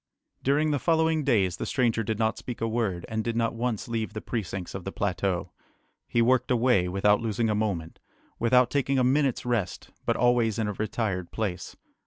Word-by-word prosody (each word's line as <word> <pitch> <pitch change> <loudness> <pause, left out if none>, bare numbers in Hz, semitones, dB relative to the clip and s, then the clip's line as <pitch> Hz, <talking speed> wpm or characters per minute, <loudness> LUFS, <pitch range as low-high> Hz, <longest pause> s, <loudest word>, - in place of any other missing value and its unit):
During 150 +3 +2
the 145 - +1
following 160 -1 +2
days 100 -10 +2
the - - -3
stranger 120 -5 +1
did 110 0 -2
not 110 0 +1
speak 125 - -6
a 115 - 0
word, 110 -6 -1
and 110 0 -2
did 115 0 -2
not 115 0 +1
once 115 -2 -2
leave 115 -2 -3
the 110 - -4
precincts 95 -6 -4
of 95 - -6
the 95 - -4
plateau. 95 -3 -1 0.6
He 115 - +2
worked 130 +1 +2
away, 120 -7 +3
without 100 +3 +2
losing 115 0 0
a - - +2
moment, 100 -7 -2 0.4
without 125 +1 +4
taking 140 -1 +1
a 130 - +3
minute's 135 0 +2
rest, 110 -7 -2 0.2
but - - +2
always 120 -3 +2
in 110 -2 0
a 105 - -2
retired 100 -4 -2
place. 105 -5 -4
115 Hz, 195 wpm, -27 LUFS, 100-125 Hz, 0.6 s, without